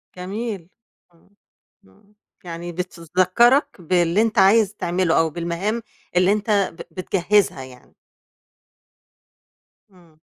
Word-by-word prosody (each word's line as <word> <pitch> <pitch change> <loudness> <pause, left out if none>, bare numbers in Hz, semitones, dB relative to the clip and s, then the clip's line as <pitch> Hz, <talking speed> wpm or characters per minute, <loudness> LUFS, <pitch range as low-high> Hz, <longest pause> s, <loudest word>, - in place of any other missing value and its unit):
جميل. 195 0 -5 0.4
إمم. 170 - -28 0.6
إمم، 95 - -26 0.3
يعني 175 0 -7
بتذكَّرَك 185 - +1
باللي 175 +3 +2
أنت 225 -3 +1
عايز 205 +1 +4
تعمله 175 -1 0
أو 165 - +2
بالمهام 175 +8 -3 0.3
اللي 180 +2 +4
أنت 210 +1 -2 0.3
ب 165 - -12
بتجهّزها 195 -5 +1
يعني. 130 -1 -16 2.0
إمم. 170 -4 -23
180 Hz, 100 wpm, -21 LUFS, 170-205 Hz, 2.0 s, عايز